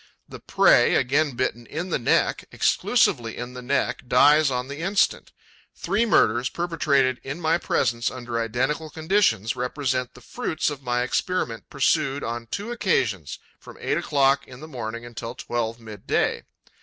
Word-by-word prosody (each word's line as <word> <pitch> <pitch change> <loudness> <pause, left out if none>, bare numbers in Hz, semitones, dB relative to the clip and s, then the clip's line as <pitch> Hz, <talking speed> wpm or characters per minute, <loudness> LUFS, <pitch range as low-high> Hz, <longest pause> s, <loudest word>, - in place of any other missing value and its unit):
The - - -10
prey, - - +4
again 140 +2 +1
bitten 120 -1 -2
in 170 +4 -5
the - - +1
neck, 120 - +1
exclusively 115 -1 +1
in 120 +1 -6
the 125 - -8
neck, 135 +3 -1
dies 145 +4 +5
on 125 -1 -2
the 140 +2 -7
instant. 195 +4 0 0.4
Three 220 +4 0
murders, 120 - +3
perpetrated 145 -7 0
in 140 +5 -5
my 165 0 +1
presence 115 -7 0
under 120 -2 -5
identical 130 +8 -1
conditions, 160 - +1
represent 125 0 -2
the - - -12
fruits 155 - -2
of 145 -1 -7
my 125 -1 0
experiment 125 -3 -2
pursued, 140 0 +1
on 115 0 -4
two 205 - -5
occasions, 115 - -1 0.2
from - - -13
eight - - 0
o'clock 140 -1 +2
in 125 -1 -12
the 155 - -9
morning 115 -4 -6
until 115 0 -7
twelve 120 -2 -3
midday. 110 -3 -2
130 Hz, 155 wpm, -24 LUFS, 120-155 Hz, 0.4 s, dies